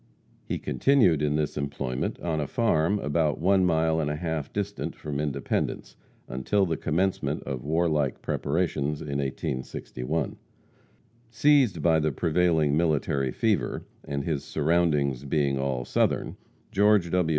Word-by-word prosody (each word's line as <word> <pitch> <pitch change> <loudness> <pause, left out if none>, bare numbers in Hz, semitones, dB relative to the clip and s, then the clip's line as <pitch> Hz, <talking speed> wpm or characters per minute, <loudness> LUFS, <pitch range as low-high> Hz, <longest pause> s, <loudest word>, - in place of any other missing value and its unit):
He - - -3
continued 115 - +3
in 75 -1 +1
this 75 -1 -1
employment 70 -3 -3
on 80 -3 -1
a 75 - -2
farm 100 -3 +2
about 75 -3 0
one 95 +2 +3
mile 80 -2 +2
and 75 -2 0
a 75 - -1
half 80 -2 -3
distant - - -3
from 75 -2 -5
Independence, 75 -3 -2 0.3
until 80 +11 +1
the 85 -2 -1
commencement 90 +6 -1
of 65 -3 -5
warlike 75 -3 +1
preparations 75 -2 -1
in 70 -2 -3
1861. 65 +2 -3 0.9
Seized 125 - +3
by 80 -2 +4
the 75 0 +1
prevailing 80 -1 +2
military 75 -5 +1
fever, 100 - 0 0.2
and 70 -1 -3
his 75 -3 -2
surroundings 75 -5 +1
being 70 -1 0
all 65 -2 -1
Southern, - - 0 0.4
George 100 -3 +3
W. 90 -3 +2
75 Hz, 135 wpm, -27 LUFS, 70-85 Hz, 0.9 s, by